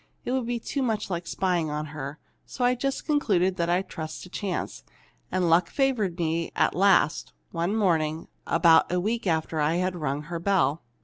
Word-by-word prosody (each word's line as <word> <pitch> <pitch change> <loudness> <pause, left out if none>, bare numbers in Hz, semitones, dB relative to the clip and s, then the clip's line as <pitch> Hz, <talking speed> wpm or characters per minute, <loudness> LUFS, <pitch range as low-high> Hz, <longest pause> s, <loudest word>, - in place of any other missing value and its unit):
It - - -2
would 255 -2 -1
be 240 -1 -1
too 275 +4 -3
much 220 -6 -1
like 170 -1 -3
spying 175 -4 0
on 150 +1 -3
her. 145 0 -6 0.3
So 250 - -2
I 250 - +4
just 270 +2 -2
concluded 190 - +1
I'd 175 +3 +1
trust 155 -3 -6
to 180 - -11
chance. 185 - -4 0.5
And 185 -1 +1
luck 170 +1 +4
favored 235 -10 0
me 165 -1 -1
at - - +2
last, 195 -5 +3 0.2
one 170 +4 -1
morning, 160 -6 +1 0.2
about 165 -1 +5
a 180 - +1
week 220 +3 -1
after 160 -1 0
I'd 175 +5 +1
rung 150 -3 -2
her 170 +2 -5
bell. 170 -4 +1
175 Hz, 180 wpm, -26 LUFS, 160-205 Hz, 0.5 s, about